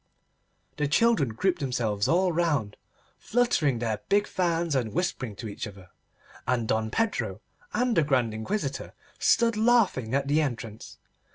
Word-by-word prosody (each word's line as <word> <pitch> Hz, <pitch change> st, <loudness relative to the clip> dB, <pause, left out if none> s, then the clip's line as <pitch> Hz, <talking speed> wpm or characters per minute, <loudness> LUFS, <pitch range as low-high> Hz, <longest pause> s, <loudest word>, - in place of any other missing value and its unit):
The 150 Hz, -, +1 dB
children 220 Hz, -, +3 dB
grouped 180 Hz, -, 0 dB
themselves 115 Hz, -7 st, -1 dB
all 180 Hz, +2 st, +3 dB
round, 150 Hz, -11 st, 0 dB, 0.4 s
fluttering 210 Hz, -, +1 dB
their 115 Hz, -2 st, -2 dB
big 205 Hz, +1 st, +3 dB
fans 170 Hz, -3 st, 0 dB
and 120 Hz, -6 st, -1 dB
whispering 135 Hz, -, -2 dB
to 110 Hz, +3 st, -7 dB
each 105 Hz, -, -5 dB
other, 95 Hz, -3 st, -13 dB, 0.6 s
and 120 Hz, -3 st, +1 dB
Don 110 Hz, 0 st, 0 dB
Pedro 225 Hz, -, -1 dB, 0.3 s
and 245 Hz, -1 st, +1 dB
the -, -, +5 dB
Grand 130 Hz, -6 st, +1 dB
Inquisitor 135 Hz, -, -3 dB, 0.2 s
stood 230 Hz, -1 st, +3 dB
laughing 210 Hz, -, +2 dB
at 140 Hz, 0 st, 0 dB
the 150 Hz, +2 st, +3 dB
entrance. 115 Hz, -6 st, -5 dB
140 Hz, 145 wpm, -27 LUFS, 115-185 Hz, 0.6 s, the